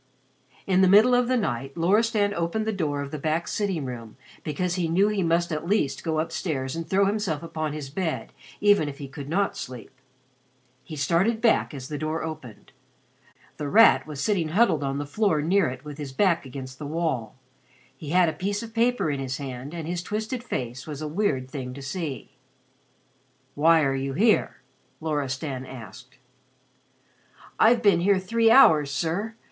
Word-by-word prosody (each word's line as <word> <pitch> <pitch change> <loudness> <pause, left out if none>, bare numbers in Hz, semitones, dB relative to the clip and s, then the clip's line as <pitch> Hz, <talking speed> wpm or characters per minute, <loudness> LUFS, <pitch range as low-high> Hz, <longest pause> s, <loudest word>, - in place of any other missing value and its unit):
In 190 -1 +3
the 190 - +6
middle 215 +6 +6
of 245 0 +3
the 255 0 +2
night 135 - -3
Loristan 205 +4 +2
opened 170 +5 -1
the 220 - -1
door 145 -7 -2
of 140 - -8
the 155 - -5
back 160 +3 -1
sitting 190 -8 -2
room, 115 -3 -8 0.3
because 175 +4 -2
he 175 -2 -1
knew 195 +5 +3
he 210 -2 -1
must 170 0 +1
at 155 +1 -3
least 195 -8 0
go 160 -1 -1
upstairs 150 -4 -3
and 165 -1 -5
throw 195 +1 +3
himself 195 -7 -1
upon 155 -2 -3
his 145 -3 -6
bed 170 0 -3 0.3
even 205 -7 +4
if 140 - -9
he 140 - -7
could 140 +1 -9
not 195 +4 0
sleep. 125 -4 -8 0.9
He 155 - -8
started 180 +10 +1
back 230 -1 +2
as 135 -4 -7
the 150 0 -5
door 155 +1 -2
opened. 155 -9 -8 0.9
The 150 -2 -4
Rat 225 -2 +6
was 150 -3 -7
sitting 180 0 0
huddled 170 -3 +2
on 135 0 -2
the 145 - -3
floor 185 +2 +1
near 175 +4 +2
it 130 +3 -9
with 150 0 -8
his 145 -3 -5
back 170 -1 +1
against 130 0 -8
the 150 - -5
wall. 150 -8 -2 0.6
He 145 +2 -9
had 180 +2 +4
a 160 - 0
piece 200 +4 -3
of 225 -1 -9
paper 235 -7 +1
in 140 - -3
his 135 0 -3
hand 135 0 -6
and 165 -2 -6
his 175 0 -2
twisted 220 +6 -4
face 125 - -5
was 150 0 -6
a - - -3
weird 150 -6 -1
thing 130 -2 -6
to 140 - -8
see. 145 0 -5 1.2
"Why 160 +2 +4
are 135 -1 +1
you 135 0 -2
here?" 215 - +2 0.4
Loristan 140 -3 -3
asked. 120 -7 -11 1.4
"I've 235 +1 +5
been 200 -5 +5
here 195 +3 +3
three 225 +5 +2
hours, 155 - +6
sir. 175 +10 -2
160 Hz, 185 wpm, -25 LUFS, 140-200 Hz, 1.4 s, the